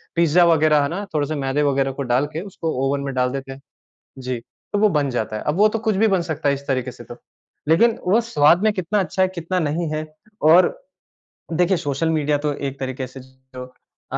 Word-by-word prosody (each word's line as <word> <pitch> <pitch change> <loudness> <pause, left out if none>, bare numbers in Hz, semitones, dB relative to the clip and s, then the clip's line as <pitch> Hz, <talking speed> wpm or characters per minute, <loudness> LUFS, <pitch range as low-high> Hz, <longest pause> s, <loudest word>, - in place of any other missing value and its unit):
Pizza 170 +1 +4
वग़ैरह, 155 -2 +4
है - - 0
ना? 195 +5 -4
थोड़े 145 -2 0
से 155 - -3
मैदे 135 +3 0
वग़ैरह 135 0 0
को - - -1
डाल 130 +4 +3
के, 160 - -3
उसको 165 -2 -3 0.2
ओवन 140 +1 -1
में 135 - -4
डाल 125 -1 0
देते 135 -1 -5
हैं। 135 +1 -10 0.7
जी। 125 -2 -2 0.3
तो 205 - +1
वो 215 +1 +4
बन 145 -2 +1
जाता 110 -3 -3
है। - - -5
अब 150 - +1
वो 210 +3 +5
तो - - +1
कुछ 215 -3 +1
भी 220 +3 +3
बन 190 - +3
सकता 160 -4 -2
है, 140 - +3
इस 140 0 -10
तरीके 130 -2 -2
से 120 - -13
तो। 120 - -10 0.5
लेकिन 220 +9 +4
वो 205 +6 +4
स्वाद 170 -6 +3
में 215 0 +3
कितना 185 +1 -1
अच्छा 190 0 -1
है, 185 - +3
कितना 170 +2 -2
नहीं 160 +1 -1
है, 155 0 -3 0.4
और 165 +4 +6 0.9
देखिए, 180 +3 +2
सोशल 145 +2 -2
मीडिया 150 -2 +1
तो 150 - +1 0.2
एक 135 +1 -13
तरीके 130 -1 -4
से, 130 +2 -12
जो 130 0 -12 0.5
अ, - - -1
150 Hz, 235 wpm, -21 LUFS, 135-175 Hz, 0.9 s, और